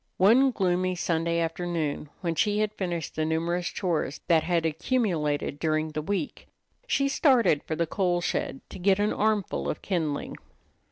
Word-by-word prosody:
One 235 +8 +6
gloomy 185 -4 0
Sunday 170 -1 0
afternoon 165 -3 -2
when 170 -3 -1
she 205 +6 +1
had 215 0 0
finished 175 -5 -3
the 155 - -1
numerous 170 +3 -1
chores 165 -6 -2
that 165 -2 +4
had 170 0 0
accumulated 160 - 0
during 155 0 0
the 155 0 -3
week, 200 - -3 0.4
she 275 - +2
started 260 - +3
for 160 - -4
the 170 - 0
coal 175 +1 0
shed 175 -5 -2
to - - -8
get 190 +1 +3
an 205 +1 +1
armful 210 -3 0
of - - -4
kindling. 160 -7 -2
175 Hz, 160 wpm, -27 LUFS, 160-200 Hz, 0.4 s, One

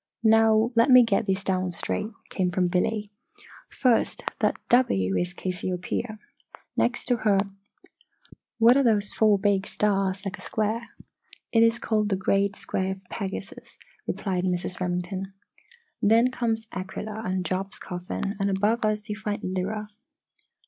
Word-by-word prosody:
"Now 225 +1 +4
let 230 +4 +4
me 255 -1 +9
get 215 -4 +1
these 190 0 0
down 185 -2 0
straight," 210 +5 -3 0.2
came 185 -2 0
from 180 0 +1
Billy. 205 +3 -1 0.6
"First, 250 -3 +1 0.2
that - - +1
'W' 95 - +3
is 180 - -1
Cassiopaeia. 185 +5 -3 0.6
Next 240 0 +1
to 245 -1 +2
her 210 -3 +2 1.2
what 235 +2 +6
are 280 - +4
those 210 -5 +2
four 215 -2 +4
big 200 -1 +1
stars 195 -1 0
like 195 +1 -4
a - - -9
square?" 220 +2 -2 0.6
"It 225 - +4
is 230 0 +4
called 215 -3 0
the 195 - +1
Great 195 +1 +1
Square 190 -1 -2
of 190 0 -14
Pegasus," 195 -1 -6 0.3
replied 185 -3 -2
Mrs. 180 0 -2
Remington. 185 +2 -3 0.7
"Then 230 +4 +4
comes 225 -3 -1
Aquilla 210 +4 -5
and 185 -3 -2
Job's 190 +2 -3
Coffin, 180 +3 -4
and 200 0 +1
above 210 +5 +1
us 215 -1 0
you 210 - -3
find 210 -1 -4
Lyra." 195 +3 -3
205 Hz, 145 wpm, -26 LUFS, 185-220 Hz, 1.2 s, me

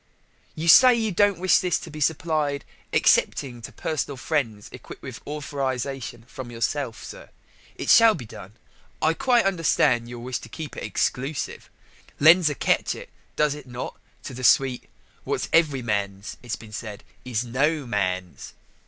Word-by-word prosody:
"You 160 +2 -4
say 250 +9 +8
you 220 -2 -1
don't 200 +1 +3
wish 185 +1 +4
this 180 -2 +1
to 165 - -9
be 150 0 -8
supplied 150 -2 0 0.3
excepting 120 -3 +2
to 115 - -8
personal 145 -3 -3
friends 125 -7 -2
equipped - - -11
with - - -7
a - - -13
authorization 135 -4 -4
from 130 -1 -8
yourself, 115 -1 -3
sir. - - -10 0.5
It - - -6
shall 225 -2 +7
be 125 - -8
done. 105 -1 -11 0.5
I 160 - +2
quite 240 +5 +2
understand 155 -10 +2
your 120 - -7
wish 120 +1 -4
to 115 - -12
keep 150 +5 -7
it - - -6
exclusive: 135 +3 -2 0.5
lends 160 +2 +7
a 145 - -3
catchit, - - -1 0.3
does 150 -1 +2
it 145 -3 -10
not, 125 0 -6 0.3
to 135 - -7
the 130 +1 -7
suite? 130 0 +3 0.3
What's - - -2
every 150 -6 +3
man's, 100 -2 -3
it's 120 0 -4
been 110 -4 -13
said, 105 -2 -7 0.2
is 125 -2 -2
no 140 +5 0
man's." 95 -5 -3
135 Hz, 160 wpm, -24 LUFS, 120-160 Hz, 0.5 s, say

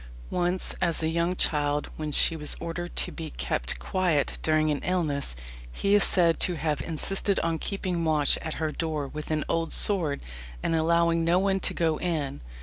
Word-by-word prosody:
"Once 180 +1 -1
as 170 -2 +1
a 160 - +1
young 170 +2 0
child, 150 -3 +1
when 155 -1 -4
she 165 - +3
was 150 -2 0
ordered 170 +1 -5
to - - -1
be - - -6
kept - - -2
quiet 155 - 0
during 155 -1 +2
an 145 - -1
illness, 150 - 0 0.4
he 200 - 0
is 205 - +6
said 170 -3 +3
to 180 - +3
have 150 -3 -1
insisted 190 +6 0
on 165 -1 -1
keeping 185 -3 -2
watch 155 -3 +2
at 160 - -4
her 155 -1 -2
door 155 -3 -3
with 150 +2 -7
an 155 -1 0
old 165 0 -1
sword, 170 -9 +3 0.4
and - - 0
allowing 165 +1 +2
no 170 +2 +3
one 195 0 +1
to - - -1
go 160 -2 +1
in." 150 -6 -2
165 Hz, 185 wpm, -27 LUFS, 150-175 Hz, 0.4 s, is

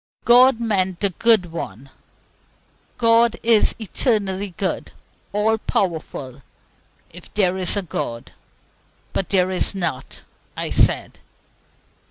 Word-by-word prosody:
God 245 0 +6
meant 190 -6 -1
"the 200 -2 +1
good 210 -3 +3
one." 135 - -7 1.1
"God 230 0 +3
is 225 -2 +4
eternally 200 -4 -2
good, 195 -3 -3 0.4
all 220 +2 +1
powerful, 155 - -3 0.7
if 175 +1 -13
there 190 -3 +2
is 185 +2 +1
a 200 - -1
God. 115 -8 -5 0.8
But 195 - -2
there 185 -1 +1
is 185 +2 0
not," 165 -9 -5 0.3
I - - -3
said. - - +1
195 Hz, 110 wpm, -21 LUFS, 175-220 Hz, 1.1 s, God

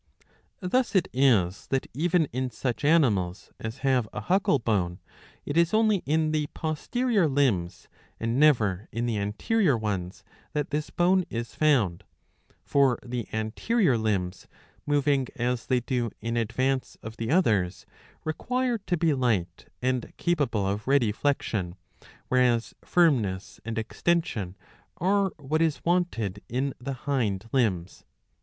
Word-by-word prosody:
Thus 235 +6 0
it 185 - +3
is 110 -9 +2
that 135 -1 0
even 165 +4 +2
in 130 +1 -1
such 125 +2 -3
animals 105 - +2
as 110 +3 -5
have 125 -5 +2
a - - -5
huckle 190 -5 +2
bone, 100 -7 -1 0.5
it 145 - -3
"is 170 +4 +3
only 215 -2 +4
in 155 +1 +2
the 155 -1 0
posterior 200 +6 0
limbs 125 - 0 0.3
and 115 +3 -1
never 110 -10 +3
in 115 +1 -2
the 115 -3 -1
anterior 135 - +1
ones 95 -3 -3 0.3
that 150 -2 -2
this 150 0 -2
bone 185 +2 +3
is 115 0 -4
foundn 125 - +2 0.6
For 135 -3 +3
the 120 -2 -4
anterior 130 - +1
limbs, 100 -5 -1 0.4
moving 145 -2 +2
as 125 -2 -1
they 125 -2 +2
do 120 -1 -1
in 115 +1 -3
advance 130 +3 -1
of 110 +1 -8
the 115 - -3
others, 105 - +2 0.4
require' 245 +9 -1
to 180 -3 -1
be 160 -1 +2
light 110 -10 -1 0.2
and 130 -1 -1
capable 135 - 0
of 100 +3 -3
ready 135 -6 +3
flexion, 105 -8 -1 0.5
whereas 125 -2 +2
firmness 120 - +1
and 115 +1 -4
extension 110 - -1 0.4
are 195 +2 +2
what 155 +2 -1
is 160 -3 0
wanted 115 - 0
in 130 +3 -1
the 135 +3 -4
hind 115 -8 0
limbs. 95 -9 0
130 Hz, 135 wpm, -27 LUFS, 110-155 Hz, 0.6 s, only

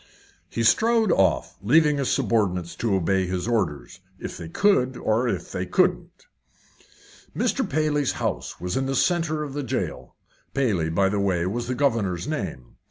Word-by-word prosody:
He 115 - -2
strode 225 - +3
off, 95 - +1
leaving 150 +7 +4
his 135 - 0
subordinates 100 -9 0
to 110 -4 0
obey 95 +1 +1
his 90 +2 -3
orders 95 -6 -2 0.2
if - - -7
they 85 -1 -8
could, 130 - +2
or 115 +3 +1
if 95 -7 -3
they - - -3
couldn't. - - 0 1.1
Mr. - - 0
Paley's 150 -1 +1
house - - -3
was 90 0 -3
in 135 0 0
the 135 - -1
centre 165 -1 +1
of 145 -3 -6
the 145 - -3
jail. 120 - -4 0.4
Paley, 105 -13 +1
by 95 +4 +2
the 100 +1 0
way, 90 -4 +1
was 115 +6 -3
the 125 - -2
governor's 110 -10 0
name. 90 - -5
115 Hz, 165 wpm, -24 LUFS, 90-140 Hz, 1.1 s, leaving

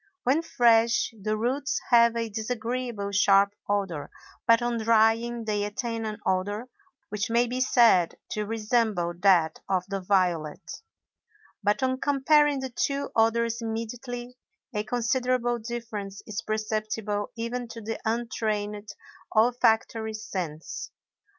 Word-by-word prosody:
When 275 +6 +3
fresh, 235 -7 +3
the 215 +1 -2
roots 265 +5 -1
have 235 -1 +6
a 230 0 -1
disagreeable 225 -1 -3
sharp 200 0 +4 0.2
odor, 195 -7 -1 0.4
but 230 0 +6
on 240 -1 0
drying 225 +1 +2
they 210 -1 0
attain 225 +2 -3
an 215 -1 -4
odor 205 +6 -1 0.4
which 205 0 -2
may 235 +1 +3
be 250 +2 -3
said 230 -9 +4 0.2
to 210 -1 -2
resemble 215 -5 0
that 180 -4 +4
of 185 -2 +1
the 195 0 -2
violet; 180 -5 -1 0.8
but 210 +6 +1
on 260 0 0
comparing 285 0 +3
the 265 -1 -5
two 280 +3 -1
odors 230 +1 +2
immediately, 240 +2 -5 0.3
a 210 -1 -1
considerable 240 +1 0
difference 220 -4 -6
is 215 +1 -4
perceptible 215 -1 -2
even 235 +1 -3
to 230 0 -9
the 225 0 -5
untrained 215 -2 -2 0.4
olfactory 225 -1 +2
sense. 175 -7 -5
225 Hz, 125 wpm, -27 LUFS, 205-240 Hz, 0.8 s, have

